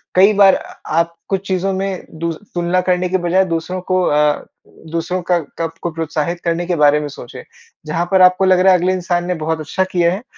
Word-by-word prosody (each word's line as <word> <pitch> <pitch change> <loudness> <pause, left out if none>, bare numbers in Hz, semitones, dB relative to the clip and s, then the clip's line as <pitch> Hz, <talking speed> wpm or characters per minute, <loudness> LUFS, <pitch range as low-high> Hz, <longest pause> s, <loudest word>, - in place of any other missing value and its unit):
कई 195 +3 +6
बार 200 -1 +6
अ - - -8 0.2
आप 170 0 +1
कुछ 195 0 -2
चीज़ों 190 0 0
में 190 -1 -3
दू 170 0 -1
तुलना 175 0 -2
करने 180 0 0
की 190 - +1
बजाय 180 +2 +2
दूसरों 180 +1 -3
को 185 0 +3
अ, 150 -2 +1 0.5
दूसरों 170 +2 -2
का 175 0 +1
को 165 +1 -7
आपको 165 +1 -4
प्रोत्साहित 165 +1 -3
करने 170 +1 0
के - - -12
के - - +1
बारे 150 0 +5
में 150 - -4
सोचें। 140 - -10 0.4
जहाँ 165 +3 -1
पर 190 - +4
आपको 185 +1 +5
लग 185 -1 +4
रहा 190 +1 +5
है 180 - +3
अगले 185 +2 +1
इंसान 175 -1 -1
ने 180 - 0
बहुत 160 0 -1
अच्छा 160 +5 -1
किया 170 -1 +2
है, 200 +5 -6
175 Hz, 225 wpm, -17 LUFS, 165-185 Hz, 0.5 s, कई